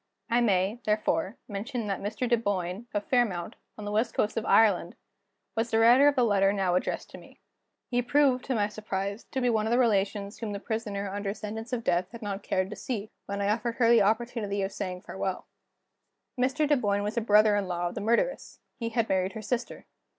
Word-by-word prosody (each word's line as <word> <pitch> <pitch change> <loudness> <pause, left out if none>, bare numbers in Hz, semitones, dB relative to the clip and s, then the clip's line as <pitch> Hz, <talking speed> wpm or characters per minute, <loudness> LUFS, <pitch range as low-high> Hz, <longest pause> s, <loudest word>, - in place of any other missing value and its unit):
I 240 +1 +4
may, 200 0 +2
therefore, 210 -1 0
mention 225 +3 -4
that 195 -2 -2
Mr. 215 +5 -2
Dunboyne, 205 -3 -1
of 205 0 -1
Fairmount, 210 -9 0 0.2
on 210 - -7
the 205 - -3
west 220 +3 0
coast 210 - 0
of 225 - -2
Ireland, 195 -6 +4 0.6
was 225 +1 0
the 225 - +1
writer 240 +5 +7
of 290 - +4
the 250 - +3
letter 200 -3 +3
now 190 -3 0
addressed 180 - -2
to - - -10
me. - - -17 0.5
He 245 0 +1
proved, 260 0 +3
to 260 - -1
my 205 -2 +2
surprise, 200 0 -4
to 265 - -4
be 250 - +1
one 220 -1 +1
of - - -1
the 240 - +3
relations 205 -3 +1
whom 220 -3 -4
the 200 - -4
Prisoner 210 -2 -3
under 200 0 -3
sentence 220 +3 -6
of 240 -2 -2
death 180 -1 +1
had 235 -1 -9
not 200 0 -4
cared 185 +1 -1
to - - -5
see, 220 -4 -4 0.2
when 200 0 -3
I 200 - +1
offered 230 +2 -1
her 235 -2 +4
the 235 -2 +6
opportunity 215 -1 0
of 195 - -2
saying 185 -3 -5
farewell. 190 -1 -4 0.9
Mr. 265 +4 +1
Dunboyne 205 -8 +1
was 210 +2 -3
a 235 - +1
brother 210 -1 +5
in 200 -2 0
law 175 -1 -1
of - - -9
the - - -5
murderess. 235 - 0 0.2
He 230 -1 -2
had 230 -1 0
married 190 0 0
her 220 - -6
sister. 240 +3 -3
215 Hz, 215 wpm, -28 LUFS, 200-235 Hz, 0.9 s, writer